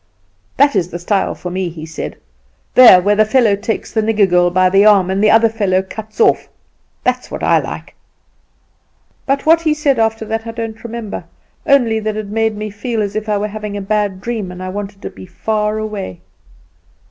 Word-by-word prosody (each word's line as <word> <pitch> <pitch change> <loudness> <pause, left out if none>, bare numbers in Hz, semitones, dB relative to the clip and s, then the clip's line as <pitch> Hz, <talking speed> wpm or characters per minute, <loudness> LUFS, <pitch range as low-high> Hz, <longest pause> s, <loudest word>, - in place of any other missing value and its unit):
'That 285 -2 +4
is 180 -3 0
the 175 - -5
style 190 +3 -1
for 180 - -7
me,' 185 0 -2
he 160 -1 -9
said; 160 0 -7 0.6
'there 240 -8 +9
where 205 +2 +3
the 215 - +5
fellow 215 -1 +3
takes 220 +3 -4
the 220 - +1
nigger 215 -2 +2
girl 175 -1 +3
by 185 +1 +3
the 195 +2 +4
arm, 200 -3 +4
and 195 +2 0
the 215 - +5
other 225 +1 +5
fellow 200 -4 0
cuts 215 +3 -10
it - - +6
off! - - +2 0.5
That's 250 0 -1
what - - -6
I - - +4
like.' - - -7 1.3
"But 275 0 0
what 325 +1 +5
he 310 -2 +1
said 285 -5 +1
after 225 0 0
that 225 +1 -4
I 230 - -5
don't 225 -1 -6
remember, 230 -3 -6 0.4
only 245 -5 +3
it 215 -1 -3
made 220 0 0
me 210 0 -5
feel 225 +3 -4
as 205 -1 -2
if 215 0 -3
I 210 - +1
were 205 +1 -2
having 210 -1 -6
a - - -4
bad 205 -2 -1
dream, 220 -5 -4
and 180 +1 -8
I 185 - -4
wanted 200 +1 -7
to - - -5
be 95 -1 -12
far 215 -1 -2
away. 210 - -5
215 Hz, 205 wpm, -16 LUFS, 195-225 Hz, 1.3 s, there